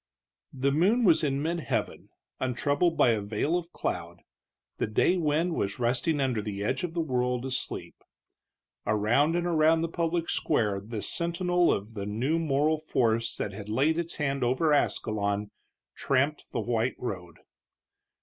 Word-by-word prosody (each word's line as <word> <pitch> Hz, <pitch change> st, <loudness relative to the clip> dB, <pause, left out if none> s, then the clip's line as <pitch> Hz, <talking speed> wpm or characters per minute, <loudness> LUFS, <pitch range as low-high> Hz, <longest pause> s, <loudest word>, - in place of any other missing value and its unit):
The 135 Hz, +1 st, +1 dB
moon 195 Hz, -, +3 dB
was 170 Hz, -5 st, +5 dB
in 140 Hz, -1 st, 0 dB
mid 170 Hz, +2 st, -1 dB
heaven, -, -, -3 dB, 0.3 s
untroubled 145 Hz, +7 st, +1 dB
by -, -, +5 dB
a 110 Hz, -2 st, 0 dB
veil 105 Hz, +11 st, -1 dB
of 175 Hz, -1 st, -3 dB
cloud; 85 Hz, -, -4 dB, 0.6 s
the -, -, 0 dB
day 110 Hz, +11 st, +2 dB
wind 165 Hz, +1 st, +1 dB
was 100 Hz, -9 st, -2 dB
resting 125 Hz, +6 st, 0 dB
under 130 Hz, -5 st, 0 dB
the 100 Hz, -1 st, -4 dB
edge 110 Hz, -, -1 dB
of 175 Hz, -1 st, -4 dB
the 170 Hz, -, +1 dB
world, 125 Hz, -3 st, -1 dB
asleep. 130 Hz, -1 st, -3 dB, 0.9 s
Around 120 Hz, +10 st, +2 dB
and 175 Hz, 0 st, 0 dB
around 160 Hz, -1 st, +3 dB
the 165 Hz, -, 0 dB
public 165 Hz, 0 st, -1 dB
square 105 Hz, -9 st, +1 dB
this 105 Hz, -1 st, -4 dB
sentinel 175 Hz, +1 st, +1 dB
of 105 Hz, +3 st, -3 dB
the 100 Hz, -2 st, -5 dB
new 130 Hz, +10 st, 0 dB
moral 155 Hz, 0 st, +1 dB
force 115 Hz, -6 st, 0 dB
that 105 Hz, -, -3 dB
had 100 Hz, +1 st, -8 dB
laid 145 Hz, +9 st, +2 dB
its 170 Hz, 0 st, -3 dB
hand 140 Hz, -3 st, -1 dB
over 130 Hz, +6 st, +2 dB
Ascalon 105 Hz, -6 st, 0 dB, 0.4 s
tramped 140 Hz, +3 st, 0 dB
the 115 Hz, -, -1 dB
white 115 Hz, +2 st, 0 dB
road. 90 Hz, -8 st, -5 dB
135 Hz, 160 wpm, -28 LUFS, 110-165 Hz, 0.9 s, was